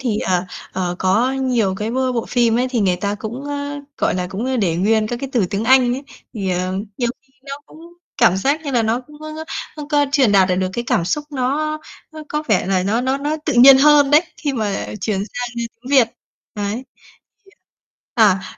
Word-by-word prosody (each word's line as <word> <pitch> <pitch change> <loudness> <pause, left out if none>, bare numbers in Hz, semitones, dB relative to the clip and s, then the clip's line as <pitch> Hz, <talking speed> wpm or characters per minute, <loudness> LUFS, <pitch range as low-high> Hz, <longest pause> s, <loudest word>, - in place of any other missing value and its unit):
thì, 235 -5 -1
ờ, 180 0 0 0.3
ờ, 180 -1 -2
có 215 +8 +2
nhiều 245 -8 0
cái 215 +3 -3
bô 260 0 0
bộ 230 -2 -2
phim 235 -2 +2
ấy 255 +1 +1
thì 240 - 0
người 185 -3 +2
ta 200 +1 -2
cũng, 235 +6 -6
ơ, 285 0 -4 0.2
gọi - - +1
là, 180 -1 -2
cũng, 195 +5 -5
ơ, 260 0 -1
để 175 -7 +1
nguyên 215 +3 +2
các 240 - -3
cái 275 - -4
từ 220 -7 +2
tiếng 205 +3 -2
Anh 255 -1 +5
ấy, 270 - -6 0.3
thì, 195 -3 -2
ờ, 180 +1 -1 0.3
nhiều 240 - +1
khi 265 0 -35
nó 275 0 -6
cũng 315 - -16 0.4
cảm 180 - +4
giác 280 +10 0
như 280 - -3
là 240 -3 +2
nó 225 +3 0
cũng 295 +4 -16
có, 310 +1 -7 0.3
ưm, 295 -1 -7
có 290 -1 +2
truyền 260 -8 +4
đạt 190 -1 +5
lại 180 - +1
được 185 0 0
cái 235 +4 -3
cảm 170 - +1
xúc 295 - -1
nó 295 +3 -1 0.3
nó 310 - -9
có 300 0 -2
vẻ 205 -4 +2
là 185 -1 +1
nó 215 +5 0
nó 265 +2 0
nó 295 +2 -2
tự 300 - 0
nhiên 265 +2 +9
hơn 290 0 +5
đấy 300 +2 +7 0.2
khi 290 -3 -2
mà 210 -5 -2
chuyển 200 0 -1
sang, 245 +4 -4
ơ, 235 - -2 0.2
tiếng 255 +3 -9
Việt, 260 -5 +5 0.5
đấy 205 0 -2 0.2
thì, - - -31 1.1
à 225 - +6
à, 185 - -11
240 Hz, 235 wpm, -19 LUFS, 200-275 Hz, 1.1 s, nhiên